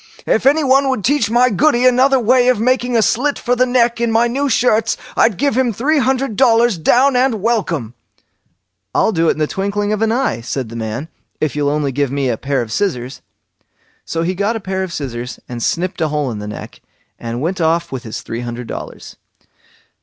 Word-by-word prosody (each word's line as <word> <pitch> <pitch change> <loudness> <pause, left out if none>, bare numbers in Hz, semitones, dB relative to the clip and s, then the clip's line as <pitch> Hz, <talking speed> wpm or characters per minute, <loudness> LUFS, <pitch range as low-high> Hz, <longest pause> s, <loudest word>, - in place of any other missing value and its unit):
If 235 - +1
anyone 275 -2 +3
would 260 -6 -1
teach 265 -3 +1
my 245 +2 +3
Goody 250 +3 +2
another 260 +2 +4
way 245 +2 +3
of 255 -4 +3
making 245 +1 +1
a 225 - +3
slit 280 +7 +1
for 245 0 0
the 255 +1 +2
neck 240 -1 +1
in 235 -1 +1
my 225 +1 +3
new 275 +4 -1
shirts, 225 -2 +2 0.2
I'd 215 -6 +3
give 280 -4 0
him 255 -2 +2
three 285 +9 +1
hundred 265 -3 0
dollars 230 -5 +3
down 255 - +3
and 250 -3 +2
welcome." 180 - -1 1.0
"I'll 220 - +3
do 165 -4 +1
it - - +4
in - - -14
the 155 - +1
twinkling 200 +4 -2
of 215 - -2
an 225 0 +2
eye", 245 - 0
said 125 0 -4
the 115 - -9
man, 115 +6 -4 0.3
"if 150 -4 -1
you'll 145 -1 0
only 145 -1 -1
give 140 +1 -1
me 140 -2 -1
a 120 - 0
pair 135 -1 -1
of 110 - -10
scissors." 135 - -2 0.8
So 165 0 -3
he 180 +2 -1
got 200 +5 -1
a - - -2
pair 190 -2 -3
of 190 -2 -4
scissors, 125 -5 -5
and 120 -1 -6
snipped 175 +7 -2
a 160 - +2
hole 150 -3 -2
in 110 - -6
the 105 - -6
neck, 105 - -9 0.4
and 115 0 -5
went 175 +6 -2
off 165 +1 +1
with 130 -2 -4
his 110 -2 -7
three 115 +1 -5
hundred 120 0 -6
dollars. - - -8
205 Hz, 215 wpm, -17 LUFS, -, 1.0 s, another